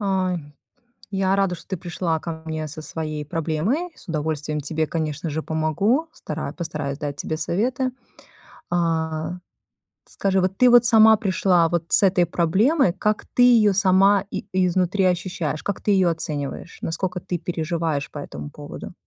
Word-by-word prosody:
Ай. 185 -6 -1 0.6
Я 195 0 +2
рада, 195 -3 +1
что 160 - -15
ты 190 - -2
пришла 170 -2 -2
ко 160 -1 -6
мне 155 -1 -3
со 155 +2 -8
своей 155 -1 -5
проблемой. 165 - -1
С - - -18
удовольствием 155 -2 -2
тебе, 155 +2 -1
конечно 160 0 -3
же, 155 +1 -3
помогу, 180 - +1
стара - - -5
постараюсь 155 -5 -4
дать 145 -2 -4
тебе 155 - -3
советы. 245 - -1 0.8
А 165 0 -1 0.7
скажи, 195 -1 0
вот 185 +1 -1
ты 250 0 +6
вот 240 0 +7
сама 220 -2 +7
пришла 185 -4 +2
вот 170 -1 -1
с - - +5
этой 185 -2 +4
проблемой, 190 - +2
как 210 +3 -1
ты 245 - 0
ее 225 -5 +6
сама 195 0 +4
и - - -5
изнутри 185 +1 +1
ощущаешь, 175 -4 -1
как 200 - -3
ты 205 - +1
ее 190 -3 +4
оцениваешь, 155 0 -4
наскока 180 +2 -2
ты 175 +1 -3
переживаешь 165 -3 -2
по 145 - -7
этому 75 - -7
поводу? - - -9
175 Hz, 155 wpm, -23 LUFS, 155-195 Hz, 0.8 s, вот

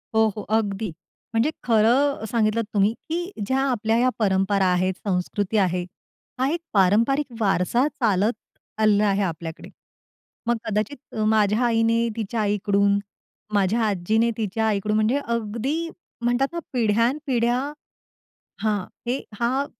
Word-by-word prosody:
हो, 220 0 +5
हो, 210 - -4 0.2
अगदी. 205 -1 -2 0.4
म्हणजे 230 +7 +2
खरं 235 +3 +3
सांगितलं 225 -1 +2
तुम्ही, 205 +2 +3 0.2
की 350 +3 -2
ज्या 265 +4 +1
आपल्या 225 -2 +1
ह्या 255 +1 +3
परंपरा 195 -1 +2
आहेत, 185 +1 +1
संस्कृती 195 +3 -1
आहे, 180 -2 +1 0.6
हा 260 - +2
एक 345 - -1
पारंपारिक 225 +9 +3
वारसा 215 - +2
चालत 215 -5 +1 0.5
आलेला 210 -1 +4
आहे 200 0 +1
आपल्याकडे. 165 -2 -5 0.8
मग 240 -1 +2
कदाचित 215 +7 -3
माझ्या 215 0 +3
आईने 230 0 +2
तिच्या 220 0 -2
आईकडून, 200 -1 +2 0.5
माझ्या 205 +3 +2
आजीने 215 +4 +1
तिच्या 220 +1 -1
आईकडून, 210 0 0
म्हणजे 220 +6 +2
अगदी 235 +5 -1 0.4
म्हणतात 245 +3 +2
ना, 340 - -2
पिढ्यानपिढ्या 240 +2 +1 1.0
हां, 210 -3 +1 0.3
हे 250 - +1 0.2
हा 260 +4 +1
220 Hz, 125 wpm, -24 LUFS, 200-240 Hz, 1.0 s, हो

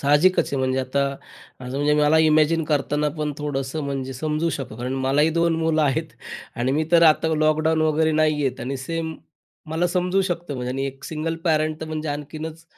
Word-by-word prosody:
साहजिकच 150 +6 +4
आहे. - - 0
म्हणजे 130 0 0
आता, 140 +2 0 0.5
म्हणजे 140 +4 0
मला 150 +2 +4
इमॅजिन 155 +1 +3
करतांना 150 0 0
पण 150 -1 -1
थोडंसं 145 0 -3
म्हणजे 135 -1 -3
समजू 155 +5 -1
शकतो. 130 -7 -5
कारण 125 +2 -3
मलाही 150 +4 +3
2 170 0 +2
मुलं 160 -1 +1
आहेत 135 -3 0 0.4
आणि 125 +2 0
मी 155 +3 +1
तर 170 0 +6
आता 160 0 +5
लॉकडाऊन 155 +1 +2
वगैरे 155 0 +2
नाही 155 0 +3
आहेत 130 -1 -2
आणि 135 +2 -3
सेम 160 +4 -4 0.6
मला 165 +2 +1
समजू 180 +2 +1
शकतो 175 -4 -3
बघा 125 0 -3
आणि 135 +2 -2
एक 135 0 -8
सिंगल 160 +1 -3
पॅरंट 155 -1 +1
तर 160 - -5
म्हणजे 155 -1 -4
आणखीनच 155 +3 -6
155 Hz, 185 wpm, -23 LUFS, 140-160 Hz, 0.6 s, तर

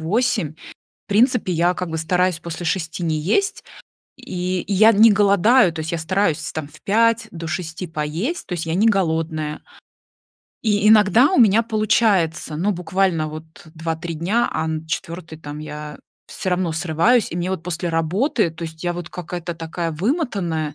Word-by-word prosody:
8. 215 - 0
В - - -15 0.3
принципе 235 -1 +3
я 175 +2 +2
как 180 -1 -4
бы 160 - -3
стараюсь 180 +1 +1
после 170 0 -6
6 165 0 -2
не 160 -2 0
есть. 300 - 0 0.5
И 180 0 -3
я 210 +3 +5
не 225 +1 +6
голодаю. 200 +1 +4
То 160 - -6
есть 160 0 -4
я - - 0
стараюсь 160 -1 0
там 155 -2 -5
в 150 - -17
5 230 +2 +2
до 165 -1 -7
6 170 +1 -4
поесть. 160 - -3
То 180 - -4
есть 165 - -4
я 165 - -2
не 215 +5 +3
голодная. 160 -5 -1 1.0
И 210 -2 +2
иногда 220 - +6
у - - +2
меня 225 -1 +5
получается. 210 -8 +1
Но 190 +6 0
буквально 180 -2 0
вот 155 +1 -8 0.3
2-3 165 +1 -4
дня, 190 +10 0
а 160 - -1
на 160 0 -4
4, 165 +1 -5
там 145 -1 -8
я 150 0 -7 0.3
всё 185 - -5
равно 180 -2 0
срываюсь. 175 +8 +2
И 170 - -5
мне 175 +1 -2
вот 190 -4 -3
после 170 0 -3
работы, 175 - +1
то 165 +1 -11
есть 160 0 -8
я 175 -1 0
вот 175 -1 -7
какая-то 175 -1 -6
такая 165 0 -4
вымотанная. 175 - -1
175 Hz, 175 wpm, -21 LUFS, 160-205 Hz, 1.0 s, не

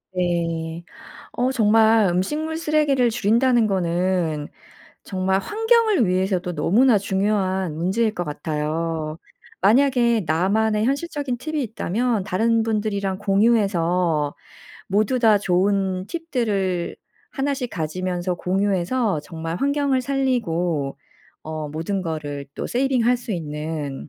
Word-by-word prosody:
네. 170 -2 -1 0.5
어 250 +2 0
정말 220 -2 +4
음식물 300 - -1
쓰레기를 295 -6 +2
줄인다는 235 +2 +3
거는 175 -4 0 0.6
정말 190 0 0
환경을 445 - +2
위해서도 185 -1 0
너무나 220 - +4
중요한 190 -3 0
문제일 210 +7 0
것 175 - -2
같아요. 155 +1 -3 0.4
만약에 235 0 +4
나만의 210 +6 +1
현실적인 280 -1 -2
팁이 310 +2 -3
있다면 225 0 -1
다른 225 +5 +1
분들이랑 205 -3 -1
공유해서 185 -7 +1 0.5
모두 215 +6 +1
다 220 -3 +5
좋은 190 0 0
팁들을 215 - -2 0.3
하나씩 270 -3 -2
가지면서 180 +2 -2
공유해서 195 +2 0
정말 165 +2 -5
환경을 280 +1 +1
살리고 180 - -1 0.5
어 155 -1 -5
모든 165 +6 -3
거를 145 -4 -5
또 - - -3
세이빙 255 -1 +1
할 245 +1 +4
수 240 -1 -9
있는 150 -4 -5
195 Hz, 260 characters per minute, -22 LUFS, 170-240 Hz, 0.6 s, 다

